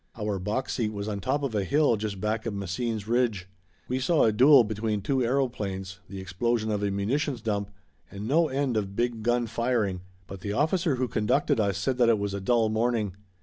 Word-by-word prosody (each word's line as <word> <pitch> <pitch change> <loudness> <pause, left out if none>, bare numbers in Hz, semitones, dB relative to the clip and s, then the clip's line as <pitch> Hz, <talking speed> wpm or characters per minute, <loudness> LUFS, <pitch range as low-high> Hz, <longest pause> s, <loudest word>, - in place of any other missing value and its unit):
Our 105 -3 -2
box 105 +8 -2
seat 110 -4 -1
was 100 0 -4
on 105 -2 -3
top 145 +8 -1
of 135 -5 -2
a 105 -2 0
hill 140 +3 +3
just 105 -2 -4
back 110 +2 -2
of 105 - -3
Messines 105 +3 -3
ridge. 115 -6 0 0.4
We 130 +1 -1
saw 155 +4 +3
a 110 - +4
duel 130 +4 +7
between 105 -1 -2
two 130 +1 +1
aeroplanes, 105 -8 -2
the 100 - -7
explosion 110 +4 -1
of 105 -1 -1
a 100 - 0
munitions 125 +8 -1
dump, 105 -3 -2 0.4
and 100 +2 -6
no 160 +5 +3
end 135 -4 -1
of 100 -2 -3
big 120 -1 -1
gun 120 +1 +1
firing 115 -6 -1 0.2
but 95 0 -9
the 100 +2 -4
officer 160 - +1
who 130 0 -1
conducted 110 0 +1
us 100 -3 +1
said 125 +6 -1
that 120 -1 +5
it 115 - +4
was 100 -1 -3
a 100 - -3
dull 115 +2 +2
morning. 110 -3 0
110 Hz, 210 wpm, -27 LUFS, 100-125 Hz, 0.4 s, duel